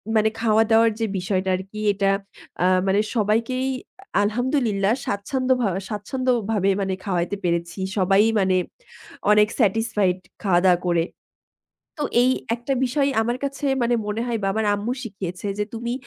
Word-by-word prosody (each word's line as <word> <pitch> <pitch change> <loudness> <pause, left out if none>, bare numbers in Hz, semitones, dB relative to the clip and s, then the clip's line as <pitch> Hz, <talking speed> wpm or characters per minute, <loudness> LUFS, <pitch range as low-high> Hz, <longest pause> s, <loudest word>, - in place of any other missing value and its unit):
মানে 220 0 +4
খাওয়া-দাওয়ার 225 0 +4
যে 225 - +1
বিষয়টা 185 0 -1
আরকি, 195 +3 -7
এটা 195 0 +1 0.5
আ - - +4 0.2
মানে 195 +2 +3 0.2
সবাইকেই 230 +4 +1 0.6
আলহামদুলিল্লাহ 225 -2 +1
স্বাচ্ছন্দ্যভা 250 +2 0 0.2
স্বাচ্ছন্দ্যভাবে 220 -2 0
মানে 190 -1 -1
খাওয়াইতে 180 0 -1
পেরেছি। 170 +1 -1 0.2
সবাই 195 +2 +4 0.2
মানে 190 -1 +2 0.8
অনেক 210 0 +5
স্যাটিসফাইড 210 -3 +2 0.3
খাওয়া-দাওয়া 180 -1 +3
করে। 170 -1 +2 0.9
তো - - 0 0.2
এই 255 - +4 0.2
একটা 240 +3 -3
বিষয় 275 +3 +1
আমার 240 +2 -1
কাছে 280 +1 -3 0.2
মানে 240 0 +2
মনে 215 +2 -2
হয় 235 -2 -1
বা - - +1
আমার 220 +1 0
আম্মু 215 +5 -2
শিখিয়েছে 195 -3 -6
যে - - +2
"তুমি 235 +1 -3
210 Hz, 135 wpm, -23 LUFS, 195-235 Hz, 0.9 s, অনেক